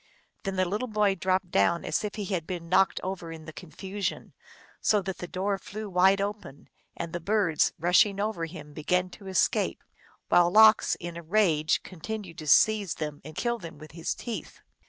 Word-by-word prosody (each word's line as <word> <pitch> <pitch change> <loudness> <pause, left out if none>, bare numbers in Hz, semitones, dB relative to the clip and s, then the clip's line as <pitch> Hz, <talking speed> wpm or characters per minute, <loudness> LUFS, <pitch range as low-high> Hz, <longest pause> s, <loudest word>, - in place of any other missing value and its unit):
The 195 - 0
little 210 +8 -2
boy 210 -3 +2
dropped 185 0 -1
down 135 +13 +2
as - - -1
if 210 - -4
he 210 - -4
had 180 -4 -3
been 175 -2 -5
knocked 190 +2 +3
over 185 -3 -5
in 160 -1 -9
the 155 - -9
confusion, 190 +4 -5 0.5
so 210 - +3
that 190 0 -5
the 180 - -5
door 195 +2 -2
flew 215 +2 -7
wide 190 +2 +4
open, 200 -8 -5 0.3
and 170 -1 -5
the 175 - -2
birds, 190 -3 +2
rushing 180 +4 +3
over 205 -5 -1
him, 150 -3 -10
began 180 +4 0
to 195 0 -12
escape, 190 - +1 0.4
while 175 -1 +5
Lox 220 +3 +6
in 170 -1 -6
a - - -6
rage 165 -4 +2
continued 185 0 -7
to 155 - -7
seize 210 +3 +4
them 150 -2 -5
and 155 +2 -10
kill 235 +4 -1
them 165 -4 -9
with 155 0 -12
his 165 +1 -3
teeth. 235 -2 -7
185 Hz, 185 wpm, -28 LUFS, 165-205 Hz, 0.5 s, Lox